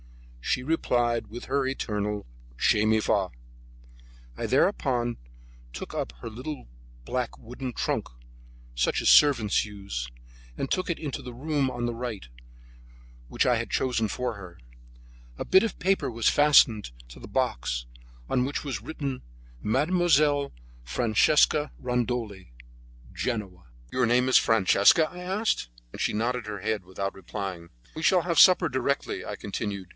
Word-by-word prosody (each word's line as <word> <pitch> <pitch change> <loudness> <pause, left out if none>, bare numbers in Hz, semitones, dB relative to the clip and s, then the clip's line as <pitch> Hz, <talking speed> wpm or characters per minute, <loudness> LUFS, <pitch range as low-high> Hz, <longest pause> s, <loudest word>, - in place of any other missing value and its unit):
She 125 - 0
replied 120 -6 0
with 120 +4 -8
her 135 0 0
eternal 105 -5 -2 0.3
"Che 105 - +3
mi 110 0 +3
fa!" 100 -3 +1 1.1
I - - -3
thereupon 120 -2 +1 0.5
took - - -7
up - - -3
her - - -6
little 130 - -7 0.4
black 125 - -3
wooden 125 +2 -7
trunk, - - -2 0.7
such - - +1
as - - -1
servants 120 -8 +5
use, 100 - -6 0.5
and 135 - -3
took 185 -1 -1
it 170 - -1
into 145 -4 -4
the 125 - -8
room 145 0 0
on 120 -1 -3
the 120 - -1
right, 115 - -5 1.0
which - - +1
I - - +4
had - - -4
chosen 115 -4 0
for 125 +2 -2
her. 90 -4 -11 0.8
A - - -4
bit 190 +2 +5
of 225 - -3
paper 190 -7 +1
was 115 -1 0
fastened 125 - +5 0.2
to - - -12
the - - -10
box, - - -1 0.4
on 125 - +1
which 140 +2 -3
was 125 -9 -3
written, 140 0 -5 0.4
Mademoiselle 145 +1 +2 0.3
Francesca 125 - +3
Rondoli, 120 - -2 0.6
Genoa. 100 - -4 0.2
"Your 125 -2 +1
name 125 +2 +3
is 130 - +6
Francesca?" 115 - +4
I 180 - -11
asked, 190 - -1 0.2
and - - -6
she - - +1
nodded 120 +1 -1
her 105 -1 -5
head, 105 +1 -2
without 95 +2 -4
replying. 95 -3 -6 0.3
"We 160 - -5
shall 180 +1 +4
have 170 -2 +1
supper 180 -2 +7
directly," 140 0 -2
I - - -5
continued. 100 -2 -4
120 Hz, 145 wpm, -27 LUFS, 105-140 Hz, 1.1 s, supper